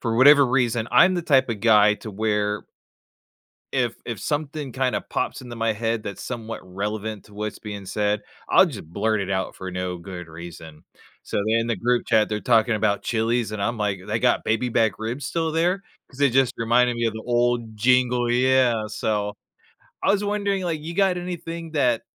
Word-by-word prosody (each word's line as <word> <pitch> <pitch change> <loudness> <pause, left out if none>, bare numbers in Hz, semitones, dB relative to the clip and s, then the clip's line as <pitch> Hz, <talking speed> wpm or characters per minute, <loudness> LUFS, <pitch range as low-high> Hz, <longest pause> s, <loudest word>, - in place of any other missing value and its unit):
for 115 -2 -1
whatever 140 +2 +8
reason, 120 -3 +1
I'm 185 +2 +6
the 175 - -1
type 135 -6 +3
of 110 -3 -3
guy 105 -2 +5
to 110 - -9
where 105 0 -1 1.1
if 120 -3 +1
if 120 -2 -4
something 145 -2 -3
kinda 130 0 0
pops - - -2
into 120 -2 -8
my 115 0 +1
head 115 +1 -2
that's 100 -3 -6
somewhat 115 -1 -5
relevant 105 +3 -4
to 105 - -17
what's 105 +1 -4
being 105 -2 -7
said, 105 +1 0 0.3
I'll - - +7
just - - -7
blurt 110 +4 0
it 95 -1 -3
out 95 -1 -2
for 95 0 -6
no 90 0 -3
good 90 0 -8
reason. 80 -1 -11 0.4
So - - -5
then, 115 +1 +3
in 115 - -2
the 115 -2 -1
group 120 +5 0
chat, 110 -1 +3
they're 105 0 -1
talking 115 0 +3
about 100 -1 0
Chili's, 115 0 0
and 105 -2 -3
I'm 115 +3 -1
like, 105 -3 -1
"They 110 +2 -1
got 125 +1 +2
baby 115 +3 0
back 110 -1 +2
ribs 120 +5 -4
still 160 +1 -1
there?" 175 +4 +1 0.3
'Cause 130 - -16
they 140 -1 +4
just 130 0 +2
reminded 120 +1 +2
me 120 - -1
of 115 - 0
the 110 0 -7
old 120 -2 0
jingle, 125 +1 +2
yeah, 125 -3 +3
so 105 -1 -2 0.7
I - - +4
was 205 0 +1
wondering, 200 -2 -1
like, 165 -4 -2
you 165 +3 -6
got 190 -1 +2
anything 170 -2 -6
that, 125 -7 +2
115 Hz, 200 wpm, -23 LUFS, 105-130 Hz, 1.1 s, whatever